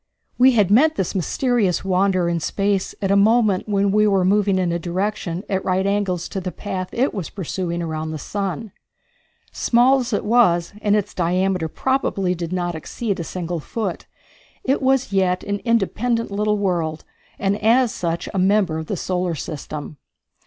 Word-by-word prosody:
We 260 +1 +6
had 205 -5 +3
met 310 +9 +5
this 190 - -2
mysterious 200 - 0
wanderer 185 -1 +2
in 170 -1 0
space 195 +3 -1
at 195 - +1
a - - +4
moment 215 -1 +3
when 200 -1 +2
we 210 +1 +4
were 195 -3 +2
moving 200 0 +3
in 180 -2 +1
a 170 - -1
direction 180 0 -3
at 190 -1 -1
right 185 +1 0
angles 200 -3 0
to 195 - -4
the 185 0 -4
path 185 -2 -5
it 260 +4 0
was 190 -6 -4
pursuing 175 -2 -3
around 160 -1 -3
the 155 - -4
sun. 200 - -4 0.8
Small 250 +3 +3
as 245 -1 -3
it 205 - -1
was, 200 -7 +3
and 205 0 +2
its 210 -2 -1
diameter 180 0 0
probably 195 - 0
did 170 -1 -5
not 175 -1 -1
exceed 195 +6 -4
a - - -2
single 175 0 -4
foot, 195 +3 -4 0.6
it 270 +2 +1
was 265 -4 +1
yet 185 -2 +1
an 205 0 -2
independent 230 +1 0
little 210 +1 0
world, 170 -6 -1 0.3
and 200 +1 -1
as 235 +2 +4
such 170 -1 -3
a 195 - 0
member 190 -4 +2
of 160 - -6
the 200 - -2
solar 180 -2 -1
system. 150 0 -6
195 Hz, 175 wpm, -21 LUFS, 175-210 Hz, 0.8 s, We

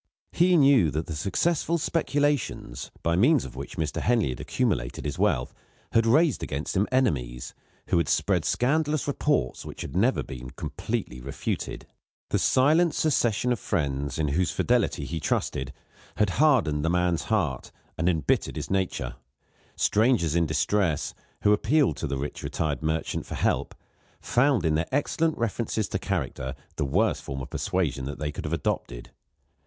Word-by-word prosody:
He 180 +1 +4
knew 135 - +5
that 75 +3 -2
the 80 - -5
successful 160 - 0
speculations, 145 - -1
by 85 0 +2
means 130 - +4
of 65 -2 -9
which 70 +2 -7
Mr. 80 -2 -2
Henley 115 - +2
had 60 - -5
accumulated - - -1
his - - -3
wealth, 60 - +1 0.4
had 115 0 +3
raised 150 +4 +4
against 70 +3 -3
him 100 +2 +2
enemies, 65 - 0 0.4
who - - +3
had 85 - 0
spread 95 -5 +2
scandalous 150 - +1
reports 145 - 0
which - - -8
had - - -6
never 115 +8 +2
been 65 0 -8
completely 60 -1 -4
refuted. 70 +2 -4 0.5
The - - +2
silent 155 +6 +3
secession 125 -5 +1
of 120 - 0
friends, 70 -5 -2
in 75 -2 0
whose 85 +5 +1
fidelity - - +1
he 80 - -4
trusted, 70 -2 -1 0.4
had 105 -3 +2
hardened 100 - +3
the 80 - +1
man's 90 -1 +1
heart 85 - -1 0.2
and 85 +3 +1
embittered 80 -6 0
his - - -5
nature. 95 -10 -1 0.6
Strangers 105 - +2
in 85 -1 +2
distress, 80 +2 0 0.3
who 105 - +5
appealed 130 +7 +2
to 80 - -3
the 70 -1 -2
rich 70 +2 -5
retired 75 -4 -2
merchant 80 +1 -2
for - - -5
help, - - 0 0.4
found 125 - +2
in 80 - +2
their 80 +2 0
excellent 155 +3 0
references 110 -2 -1
to - - -2
character 65 +1 -3 0.2
the 75 - 0
worst 65 - +1
form 70 0 -5
of - - -10
persuasion 70 -8 -1
that 70 - -5
they 75 -1 -3
could - - -7
have 75 - -3
adopted. - - -3
90 Hz, 160 wpm, -26 LUFS, -, 0.6 s, knew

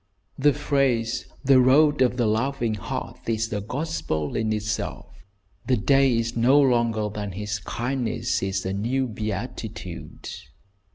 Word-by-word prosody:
The 145 +1 +5
phrase, 125 -6 0 0.2
"The 135 -1 +6
Road 145 +3 +5
of 125 -1 +3
the 120 - +2
Loving 115 +1 0
Heart," 105 - -5
is 110 -1 -1
a 105 - -1
gospel 115 - -3
in 110 -1 0
itself. 105 -2 -4 0.4
"The 130 -2 +3
day 135 +3 +4
is 115 +1 -1
not 120 +4 +4
longer 120 -5 +2
than 105 -2 -5
his 105 +2 -3
kindness" 120 +5 -2
is 95 0 -2
a 95 - -1
new 120 +7 0
beatitude. 105 -3 -6
115 Hz, 135 wpm, -25 LUFS, 105-130 Hz, 0.4 s, The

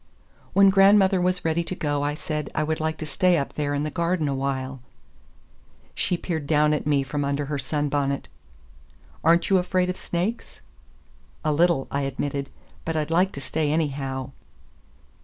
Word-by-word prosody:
When 195 -1 +6
grandmother 195 -1 +5
was 180 0 0
ready 165 +1 +1
to 185 - -4
go, 145 -4 -1
I 145 +1 -1
said 150 -1 -4
I 155 - +1
would 155 +1 -1
like 160 0 -1
to 155 - -5
stay 175 +5 +2
up 140 - -3
there 145 -1 -1
in 145 - -1
the 155 - -3
garden 170 -2 0
awhile. 135 -1 -2 1.1
She 180 - 0
peered 160 -5 -4
down 150 0 +3
at 150 - -2
me 145 -2 +2
from 145 +2 -3
under 140 +1 -1
her 145 0 -3
sunbonnet. 140 0 -1 1.0
"Are 165 +1 +6
n't 170 +3 -2
you 190 - +6
afraid 180 0 0
of 185 - -8
snakes?" 185 +7 -3 0.8
"A 155 - +2
little," 165 -3 +3
I 140 - 0
admitted, 140 +1 -3 0.3
"but 165 - -3
I'd 155 0 -1
like 180 +3 +3
to 140 - -7
stay 150 +1 -1
anyhow." 135 -4 -2
150 Hz, 175 wpm, -24 LUFS, 140-175 Hz, 1.1 s, When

